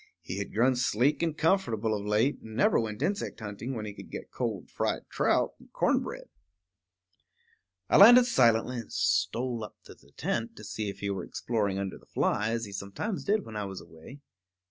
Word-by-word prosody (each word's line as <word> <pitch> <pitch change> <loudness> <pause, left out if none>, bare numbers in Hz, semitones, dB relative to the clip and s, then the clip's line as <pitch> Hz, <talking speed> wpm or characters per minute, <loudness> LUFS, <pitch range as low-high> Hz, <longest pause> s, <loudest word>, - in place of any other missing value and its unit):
He 95 - -5
had 100 - -4
grown 125 +4 +3
sleek 125 +4 +1
and 165 -2 -1
comfortable 115 - +1
of 100 - -4
late, 110 +7 +2
and 110 -1 -10
never 125 - +4
went 110 -2 -3
insect 200 -9 -2
hunting 110 +4 -5
when 110 -2 -4
he 105 - -6
could - - -11
get - - -8
cold - - -4
fried - - -2
trout - - +2
and - - -19
corn - - +2
bread. - - -7 1.6
I - - +4
landed 240 +5 +9
silently 120 - +3
and 115 - -9
stole 120 -1 0
up 105 - -9
to - - -12
the - - -23
tent 115 0 -2
to 105 - -11
see 105 0 -4
if 100 - -8
he 100 0 -1
were 95 - -3
exploring 105 -5 -2
under 100 -1 -4
the - - -23
fly, 105 +2 0
as 115 0 -1
he 100 - -10
sometimes 100 - -4
did 210 +1 +1
when 110 - -9
I 105 -1 -2
was 95 -1 -6
away. 100 - -13
115 Hz, 200 wpm, -29 LUFS, 105-130 Hz, 1.6 s, landed